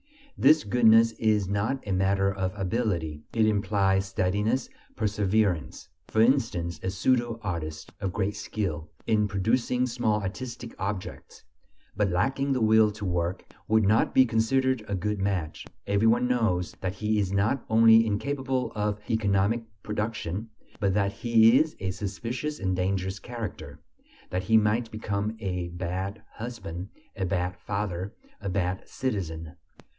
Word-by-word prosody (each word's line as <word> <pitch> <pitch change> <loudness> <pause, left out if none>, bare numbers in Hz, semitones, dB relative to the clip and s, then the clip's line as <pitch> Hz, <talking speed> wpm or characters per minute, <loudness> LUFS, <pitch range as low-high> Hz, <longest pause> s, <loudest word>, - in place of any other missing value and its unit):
This 155 0 +5
goodness 115 +1 +5
is 105 -3 +2
not 105 +6 -1
a - - -2
matter 95 +1 +2
of 95 -1 -2
ability; 90 -7 -1
it 115 -1 +3
implies 100 -2 +2
steadiness, 105 +6 0 0.3
perseverance. 100 - 0 0.2
For 110 - -1
instance, 100 - +1
a 95 - -2
pseudo 120 +4 +1
artist 80 -5 -5
of 95 -2 -1
great 95 +3 -1
skill 85 -7 -4 0.2
in 105 -2 +2
producing 115 +5 +1
small 115 -3 0
artistic 115 +4 -6
objects, 95 0 -5 0.5
but 105 0 +1
lacking 135 +10 +1
the 130 - -1
will 110 0 +5
to 105 0 -6
work, 90 0 -1 0.2
would 110 0 +4
not 105 +3 +2
be 130 - +7
considered 125 +2 +1
a 100 - -1
good 105 +2 -2
match. 95 -6 -2 0.2
Every 100 +2 +2
one 120 +2 +3
knows 110 -8 0
that 95 0 -2
he 105 +1 0
is 95 -2 0
not 105 +7 +1
only 115 0 +7
incapable 130 +4 -1
of 105 -1 -1
economic 105 +1 +1 0.2
production, 105 -1 -3 0.3
but 100 -3 +1
that 100 -1 +1
he 115 +1 +5
is 155 0 0
a 95 -1 -2
suspicious 115 +9 -4
and 95 -1 0
dangerous 95 +1 -1
character, 100 -12 -7 0.5
that 90 +1 -2
he 110 +2 +5
might 110 +2 +2
become 110 0 -3
a 90 -4 -3
bad 95 +4 -4
husband, 100 -6 -6 0.3
a 95 - -2
bad 90 -1 -1
father, 100 0 -4 0.3
a 100 - -3
bad 90 -1 -1
citizen. 85 -10 -3
105 Hz, 145 wpm, -27 LUFS, 95-115 Hz, 0.5 s, be